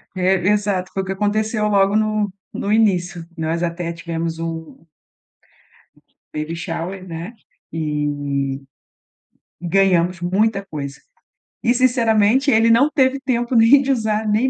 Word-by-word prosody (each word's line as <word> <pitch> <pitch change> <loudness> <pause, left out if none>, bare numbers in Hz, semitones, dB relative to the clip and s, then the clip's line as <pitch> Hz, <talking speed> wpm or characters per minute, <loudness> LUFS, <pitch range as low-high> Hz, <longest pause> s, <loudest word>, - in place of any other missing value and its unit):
É, 185 +1 +2
exato. 205 -3 0
Foi 195 - -1
o - - -8
que 190 - -4
aconteceu 210 +2 0
logo 200 -1 +3
no 215 -1 +1 0.2
no 200 - -4
início. 185 -5 +1
Nós 165 +1 -2
até 170 0 -3
tivemos 165 -1 -4
um 165 -1 -6 1.5
baby 155 +2 -4
shower, 180 +2 -5
né, 165 +4 -6 0.4
e 145 -3 -2 1.0
ganhamos 180 -1 +2
muita 195 +3 0
coisa 140 -6 -6 0.7
e 240 - +3
sinceramente 240 0 +3
ele 225 +1 +4
não 260 +6 +5
teve 275 -2 +2
tempo 245 -2 -1
nem 230 +5 +6
de 275 - 0
usar 220 -3 0
nem 215 +5 +2
195 Hz, 130 wpm, -20 LUFS, 170-220 Hz, 1.5 s, nem